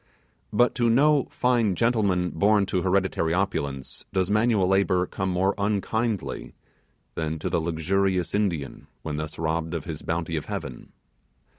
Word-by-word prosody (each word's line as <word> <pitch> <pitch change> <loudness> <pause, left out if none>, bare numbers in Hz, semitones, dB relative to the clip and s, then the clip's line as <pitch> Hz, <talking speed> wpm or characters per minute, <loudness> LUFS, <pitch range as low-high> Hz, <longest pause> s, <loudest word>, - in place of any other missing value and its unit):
But 120 +4 +3
to 120 - +4
no 140 +4 +4
fine 120 -6 +1
gentleman 100 -6 +1
born 100 +4 +3
to 95 -1 -1
hereditary 95 -3 +1
opulence, 70 -9 -2
does 95 -1 0
this - - +1
manual 105 -3 +3
labour 95 -1 +2
come 95 +1 -3
more 95 +2 +1
unkindly 105 +1 -2 0.6
than 80 0 -2
to 75 - -3
the 85 - 0
luxurious 90 +3 0
Indian 90 -9 -2 0.2
when 75 -2 -3
thus 75 0 -5
robbed 80 +1 -1
of 80 - -3
the 80 -2 -6
bounty 80 0 -2
of 75 - -4
heaven. 65 - -6
95 Hz, 150 wpm, -25 LUFS, 80-105 Hz, 0.6 s, to